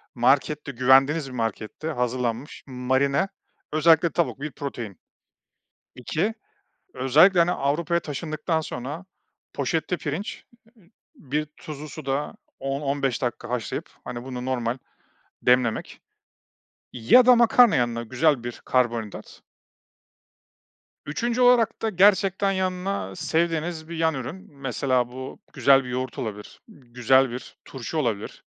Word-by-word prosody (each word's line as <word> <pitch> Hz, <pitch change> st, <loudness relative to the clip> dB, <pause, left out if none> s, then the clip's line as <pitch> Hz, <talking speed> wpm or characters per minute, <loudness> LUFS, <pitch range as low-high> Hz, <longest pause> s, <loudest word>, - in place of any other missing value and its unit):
markette, 140 Hz, +4 st, +2 dB
güvendiğiniz 135 Hz, +4 st, +4 dB
bir -, -, -10 dB
markette 115 Hz, +5 st, -4 dB
hazırlanmış, 125 Hz, -2 st, -2 dB
marine, 130 Hz, +5 st, +1 dB, 0.5 s
özellikle 160 Hz, +2 st, +5 dB
tavuk 170 Hz, -5 st, -1 dB
bir 150 Hz, +1 st, -4 dB
protein. 120 Hz, -, -6 dB, 1.0 s
2, 165 Hz, -, -1 dB, 0.6 s
özellikle, 160 Hz, +8 st, +5 dB
hani, 170 Hz, +1 st, +4 dB
Avrupa'ya 170 Hz, +5 st, 0 dB
taşındıktan 155 Hz, +1 st, -2 dB
sonra 145 Hz, +4 st, -6 dB, 0.5 s
poşette 160 Hz, +6 st, -1 dB
pirinç, 160 Hz, +7 st, -5 dB, 0.7 s
bir 150 Hz, +2 st, -3 dB
tuzlu 155 Hz, -1 st, -8 dB
suda 140 Hz, 0 st, -3 dB, 0.3 s
10-15 135 Hz, -1 st, -1 dB
dakika 120 Hz, -2 st, -3 dB
haşlayıp, 120 Hz, -3 st, -3 dB
hani, 120 Hz, 0 st, -6 dB
bunu 125 Hz, -1 st, -6 dB
normal 125 Hz, -1 st, -1 dB, 0.6 s
demlemek 125 Hz, -2 st, +1 dB, 0.9 s
ya 125 Hz, -, +5 dB
da 250 Hz, 0 st, +8 dB
makarna 235 Hz, -1 st, +6 dB
yanına, 120 Hz, -1 st, 0 dB
güzel 130 Hz, +2 st, +1 dB
bir 120 Hz, 0 st, -7 dB
karbonhidrat. 120 Hz, -4 st, -1 dB, 1.7 s
3. 235 Hz, +11 st, -1 dB
olarak 245 Hz, -3 st, +4 dB
da 225 Hz, -, +1 dB
gerçekten 195 Hz, 0 st, +3 dB
yanına 185 Hz, -, -2 dB
sevdiğiniz 165 Hz, 0 st, -1 dB
bir 170 Hz, -, -6 dB
yan 160 Hz, -1 st, +1 dB
ürün. 150 Hz, +8 st, -6 dB
Mesela 130 Hz, -2 st, 0 dB
bu, 130 Hz, +1 st, -8 dB
güzel 135 Hz, -1 st, +4 dB
bir -, -, -8 dB
yoğurt 125 Hz, -1 st, -4 dB
olabilir, 105 Hz, -2 st, -6 dB
güzel 125 Hz, 0 st, +1 dB
bir 125 Hz, +2 st, -8 dB
turşu 135 Hz, +4 st, -5 dB
olabilir. 115 Hz, -8 st, -3 dB
140 Hz, 115 wpm, -24 LUFS, 125-165 Hz, 1.7 s, da